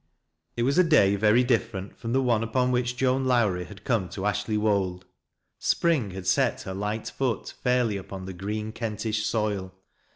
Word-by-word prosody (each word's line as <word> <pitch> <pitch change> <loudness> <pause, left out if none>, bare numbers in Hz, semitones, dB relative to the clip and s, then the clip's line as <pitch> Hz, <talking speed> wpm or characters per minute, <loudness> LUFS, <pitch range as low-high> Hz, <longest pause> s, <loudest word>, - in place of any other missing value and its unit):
It 120 - +1
was 140 +7 +2
a - - +7
day 120 - +4
very 110 +4 +4
different 115 -5 -1
from 115 -1 -5
the 135 +2 +2
ope 115 -3 +2
upon 125 +3 +1
which 125 0 0
Joan 130 +1 +1
Lowrie 105 -8 +2
had 100 +2 -13
come 110 -8 0
to 95 - -5
Ashley 105 +1 0
Wold. 95 -4 0 0.5
Spring 155 -11 +1
had 95 0 -7
set 95 - +1
her 95 - -5
light 105 +3 -3
foot 125 -6 -2
fairly 125 -4 +2
upon 95 0 -8
the 95 - -6
green 105 +4 -4
Kentish 110 -1 -2
soil. 100 -4 -2
110 Hz, 175 wpm, -26 LUFS, 100-125 Hz, 0.5 s, a